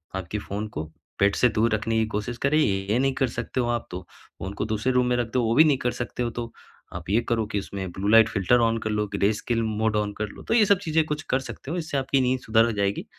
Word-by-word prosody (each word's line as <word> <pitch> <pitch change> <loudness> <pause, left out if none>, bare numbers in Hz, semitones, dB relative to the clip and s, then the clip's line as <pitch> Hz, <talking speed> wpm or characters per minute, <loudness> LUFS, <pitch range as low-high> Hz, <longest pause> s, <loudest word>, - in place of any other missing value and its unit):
आपके 95 +2 -4
फ़ोन 105 +2 -5
को 75 - -2 0.4
बेड 100 0 +3
से 125 - +4
दूर 110 +1 +2
रखने 115 +1 -1
की 110 - +2
कोशिश 110 +3 -4
करें, 140 +3 +3
ये 100 -4 +1
नहीं 135 0 +2
कर 130 - +1
सकते 130 - -4
हो 120 - -1
आप 120 -1 -2
तो 90 - -5 0.4
फ़ोन 95 +4 -5
को 100 - -3
दूसरे 110 +3 -1
रूम 125 0 +3
में 125 - +2
रख 120 -2 0
दो, 125 -1 +2
वो 115 0 +1
भी 155 - +8
नहीं 145 -3 +3
कर 125 - 0
सकते 120 0 -4
हो 120 - -1
तो 120 -1 -4 0.4
आप - - -7
ये 105 +4 +3
करो 115 -2 +1
कि 105 - -2
उसमें 95 -2 -6
ब्लू-लाइट 110 +3 +4
फ़िल्टर 105 +4 +2
ऑन 115 0 +2
कर 110 - -3
लो, 105 0 0
ग्रेस्केल 110 +3 0
मोड 110 0 0
ऑन 105 -1 -1
कर 105 - -2
लो, - - -12
तो - - -1
ये 225 -2 +5
सब 200 0 +4
चीज़ें 160 -4 +1
कुछ 150 0 -3
कर 130 - +2
सकते 135 +1 -8
हो, 175 - -2
इससे 160 -4 -3
आपकी 135 0 +1
नींद 130 0 +1
सुधर 115 +1 +3
जाएगी। 100 0 -1
115 Hz, 270 wpm, -25 LUFS, 105-130 Hz, 0.4 s, भी